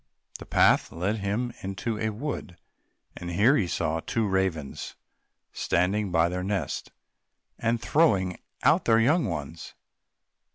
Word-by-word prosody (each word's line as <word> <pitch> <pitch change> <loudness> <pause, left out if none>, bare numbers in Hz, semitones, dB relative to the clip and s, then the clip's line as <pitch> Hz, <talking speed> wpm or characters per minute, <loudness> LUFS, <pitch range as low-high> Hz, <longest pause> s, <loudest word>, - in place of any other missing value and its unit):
The - - -10
path - - +4
led 95 +6 -1
him 110 +4 -2
into 105 +3 -3
a 110 - 0
wood, 110 - -5 0.6
and 85 - -6
here 105 +10 +4
he 100 -9 +1
saw 80 -1 -1
two 115 +7 -1
old 100 - -1
ravens 95 -7 -2 0.6
standing 95 +3 0
by 80 -1 +3
their 90 +1 -3
nest, 100 +1 -3 0.7
and 115 0 +1
throwing 100 - +2 0.2
out - - +4
their 115 -1 +5
young 145 +8 +3
ones. 80 -3 -5
100 Hz, 135 wpm, -27 LUFS, 90-115 Hz, 0.7 s, their